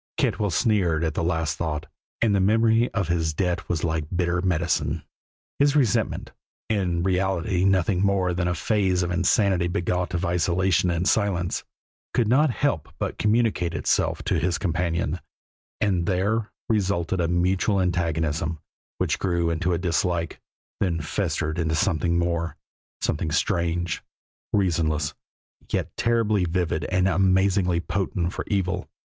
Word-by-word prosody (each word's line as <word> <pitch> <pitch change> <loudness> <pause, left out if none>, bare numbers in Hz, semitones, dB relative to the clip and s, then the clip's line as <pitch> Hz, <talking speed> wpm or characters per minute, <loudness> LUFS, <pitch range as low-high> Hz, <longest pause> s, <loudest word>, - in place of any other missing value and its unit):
Cantwell 105 -1 +1
sneered 85 -3 +2
at 80 -2 0
the 85 - -2
last 80 -2 0
thought, 75 -3 -2 0.4
and 110 -3 +3
the 100 - +3
memory 115 +4 +3
of 95 -4 -1
his 80 -2 0
debt 90 -1 -1
was 85 -3 -1
like 80 -2 0
bitter 90 -1 0
medicine. 80 -3 0 0.6
His 145 0 +4
resentment 125 -9 +1 0.4
in 90 -5 0
reality 95 0 +1
nothing 95 -1 +2
more 95 -2 +2
than 90 0 -1
a 90 - 0
phase 95 -3 +1
of 85 - -2
insanity 95 0 +2
begot 90 +1 -1
of 90 +2 -1
isolation 90 +1 +2
and 85 +2 0
silence 95 -5 +1 0.5
could 115 - +2
not 140 +7 +4
help 115 - -1
but - - -3
communicate 105 -6 +1
itself - - 0
to - - +1
his 90 0 0
companion, 85 -1 -1 0.6
and 90 -4 +1
there 105 +4 0 0.2
resulted 95 -5 0
a 85 - +1
mutual 90 +4 +1
antagonism, 80 -3 0 0.4
which - - 0
grew 85 -3 0
into 85 +2 0
a 85 - +1
dislike, 85 -1 -1 0.4
then 85 -4 0
festered 80 +1 -2
into 80 -1 0
something 85 -1 +1
more, 85 -1 -1 0.4
something 80 +1 -1
strange, 85 0 0 0.5
reasonless, 80 -6 +1 0.6
yet - - -2
terribly 110 -4 +2
vivid 85 -3 -1
and 95 0 +1
amazingly 95 -1 +2
potent 90 -1 -2
for - - -4
evil. 95 -3 -1
90 Hz, 140 wpm, -25 LUFS, 85-95 Hz, 0.6 s, His